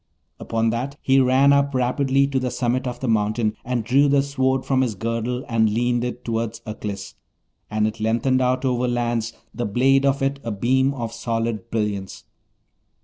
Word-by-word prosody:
Upon 115 0 0
that, 130 +5 -3
he 135 0 +3
ran 135 +2 +5
up 140 -1 +2
rapidly 135 +2 +2
to 135 -1 0
the 130 -1 -1
summit 125 +1 -1
of 120 -1 -5
the 130 - -2
mountain 110 0 +1
and 125 -2 -2
drew 135 +6 +3
the 140 0 +3
Sword 130 -2 0
from 130 -1 +2
his 120 -5 -1
girdle, 115 +4 -3
and 115 -2 +2
leaned 120 +2 +1
it 125 0 -5
toward 115 -1 -2
Aklis, 105 -2 -6 0.6
and 105 0 +1
it 110 +1 -3
lengthened 115 +4 +1
out 130 +1 +1
over 125 -1 +1
lands, 120 -1 -1 0.2
the 120 +1 -3
blade 135 +6 +3
of 140 0 +1
it 140 +1 0
a 115 - -4
beam 130 +6 +1
of 115 -3 -4
solid 115 -1 -3
brilliance. 105 -4 -3
120 Hz, 180 wpm, -22 LUFS, 115-130 Hz, 0.6 s, ran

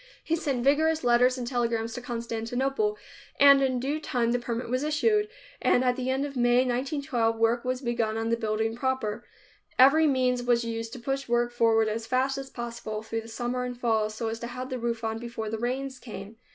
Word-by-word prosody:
He 330 - 0
sent 275 -7 -2
vigorous 315 +4 +3
letters 245 +1 +4
and 250 - -4
telegrams 235 -2 -1
to 245 - -5
Constantinople 245 - -2 0.4
and 280 -1 +8
in 260 -2 +1
due 280 +5 -1
time 240 -6 0
the 245 - +1
permit 240 0 -4
was 255 +3 -1
issued, 420 +8 +2 0.3
and 250 - +3
at 250 -1 +2
the 255 0 -3
end 265 +2 0
of 280 -1 -7
May 245 +1 +3
1912, 255 -2 0
work 230 +1 +2
was 255 0 -2
begun 230 -2 -1
on 225 0 -1
the 230 - +3
building 220 0 -1
proper. 260 -4 -2 0.5
Every 290 +5 +6
means 255 -3 +2
was 240 -1 +2
used 225 0 -4
to 255 - -7
push 270 +3 -3
work 240 0 +2
forward 225 -2 +3
as 225 +1 -3
fast 265 +1 +1
as 270 0 -7
possible, 230 -3 -5
through 225 +1 -3
the 225 - -12
summer 240 +2 -3
and 245 -1 -5
fall, 220 -3 +1
so 220 +2 -4
as 225 +1 -4
to 235 - -5
have 255 +2 -6
the 255 - -2
roof 235 -1 -2
on 225 0 -2
before 230 -2 -5
the 225 - -3
rains 260 +2 -3
came. 215 -2 -9
245 Hz, 210 wpm, -27 LUFS, 230-265 Hz, 0.5 s, and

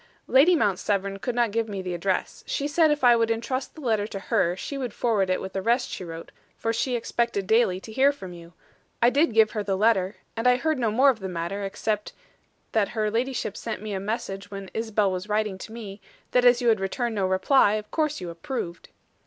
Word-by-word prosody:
"Lady 300 +7 +5
Mount 205 - +1
Severn 195 -1 -1
could 245 +3 -3
not 240 -3 +2
give 225 +1 -1
me 200 -1 -4
the 185 -1 -4
address. 185 +2 -2
She 285 - -1
said 315 +2 +3
if 295 -2 0
I 240 -1 +7
would 230 -1 +1
intrust 235 +4 -2
the 315 - -10
letter 220 -5 0
to 200 - -6
her, 175 -2 +1
she 280 - -6
would 255 -5 -4
forward 210 -6 +1
it 185 - +1
with 190 0 -7
the 195 - -2
rest 240 +5 +1
she - - -5
wrote, 165 -1 -8 0.3
for 225 - -1
she 245 +2 0
expected 235 -3 -1
daily 220 -3 +3
to 220 - -10
hear 270 +5 +4
from 190 -10 -9
you. 170 0 -13 0.5
I 240 +1 +5
did 290 +1 +3
give 220 -1 +5
her 215 - -2
the 195 -2 -1
letter, 200 -2 +2 0.2
and 225 +2 0
I 250 - +6
heard 310 +3 0
no 230 -3 +1
more 260 +6 +5
of 235 - -8
the 190 -1 -5
matter, 175 +3 -3
except 210 +2 -2 0.6
that 215 -3 +1
her 215 -1 +1
ladyship 235 -2 -2
sent 220 -2 -5
me 215 -1 -4
a 190 - -2
message 200 -2 -4
when 195 -2 -8
Isabel 220 -3 0
was 185 +3 -4
writing 210 -2 0
to 220 - -9
me, 210 -3 -8 0.3
that 250 0 +3
as 245 0 +5
you 240 - +4
had 220 -3 +3
returned 230 +5 -2
no 195 -3 0
reply, 200 +4 +4
you 215 - 0
of 210 - -26
course 305 -2 0
approved." 170 +2 -5
215 Hz, 235 wpm, -25 LUFS, 195-245 Hz, 0.6 s, I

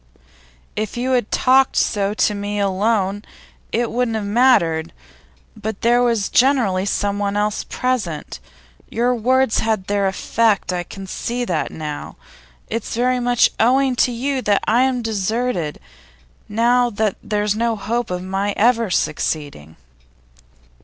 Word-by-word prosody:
If 215 +1 -3
you 255 +2 -1
had 245 -4 +1
talked 260 +1 +3
so 205 -1 +1
to 210 - +2
me 205 0 -3
alone, 200 0 0 0.5
it 235 0 0
wouldn't 240 -2 0
have 215 -2 -2
mattered. 200 -8 +2 0.6
But 215 -1 -5
there 240 +1 +3
was 230 -5 +1
generally 235 -8 +2
someone 205 0 -1
else 210 0 0
present. 215 - -3 0.5
Your 240 +2 +1
words 255 +1 +2
had 220 -4 -1
their 200 0 0
effect; 205 0 +1
I 180 - -1
can 195 +3 -9
see 240 +5 -3
that - - -1
now. 150 -2 -6 0.5
It's 230 0 -4
very 250 +2 +1
much 245 -1 +3
owing 260 +3 +3
to 250 - +3
you 260 +3 -2
that 205 -4 +1
I 235 +3 +4
am 260 -2 +1
deserted, 215 -5 -2 0.7
now 240 +3 +3
that 215 -2 -1
there's 210 -1 -1
no 230 +1 0
hope 235 +3 -2
of 180 0 -3
my 195 +2 -2
ever 230 0 +3
succeeding. 145 - -2
220 Hz, 140 wpm, -20 LUFS, 200-245 Hz, 0.7 s, I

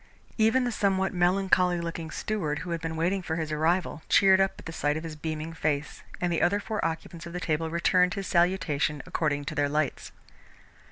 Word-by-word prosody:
Even 225 +4 +4
the 245 - -1
somewhat 190 -3 +1
melancholy 180 0 +2
looking 165 -1 -5
steward, 160 -6 -2
who 175 - -5
had 165 -1 -2
been 165 0 -3
waiting 180 +4 0
for 160 -2 -3
his 160 -2 -3
arrival, 160 +1 0
cheered 190 -1 +6
up 195 - +2
at - - -13
the 165 - -5
sight 145 -1 0
of 160 - -5
his 160 -2 -6
beaming 155 +1 -4
face, 155 -2 -2 0.2
and 175 -1 0
the 165 - 0
other 200 +4 +3
four 215 +1 -3
occupants 165 +1 -4
of 170 - -9
the 180 - -3
table 160 -1 -1
returned 180 +3 +2
his 195 -1 -4
salutation 170 -5 +1
according 150 -5 -1
to - - -4
their 145 -1 +1
lights. 150 -1 -1
170 Hz, 205 wpm, -27 LUFS, 155-185 Hz, 0.2 s, cheered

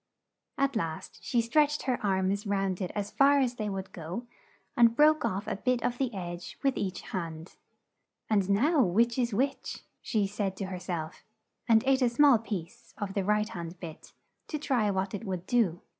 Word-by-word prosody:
At 275 -1 +1
last 165 -7 -4
she 240 - +1
stretched 295 +5 +2
her 255 -4 -1
arms 195 +1 0
round 195 -1 0
it 180 - -2
as 205 0 -3
far 280 +1 +5
as 255 -3 +1
they 215 -3 -3
would 190 -1 -5
go, 175 +8 -6 0.5
and 235 -1 +5
broke 305 +2 +5
off 195 +3 -1
a - - -3
bit 250 +2 0
of 245 0 -1
the 260 -3 0
edge 175 -3 -6
with 275 -1 +2
each 190 -2 -3
hand. 165 -4 -5 0.7
"And 200 -3 +1
now 280 +10 +4
which 230 +5 +2
is 240 -1 +1
which?" 260 +7 -2 0.2
she 215 -4 0
said 195 -1 -3
to 195 - -3
her 185 -1 -5
self, 165 -4 -5 0.5
and 220 -1 +6
ate 270 0 +3
a 250 - +4
small 260 0 +5
piece 195 -7 -7
of 200 -2 -4
the 195 - 0
right 210 +2 +1
hand 170 -4 -7
bit, 165 -3 -9 0.4
to 305 - -3
try 255 -8 +1
what 190 0 -1
it 205 - -4
would 185 -4 -4
do. 200 -8 +1
210 Hz, 190 wpm, -29 LUFS, 190-245 Hz, 0.7 s, and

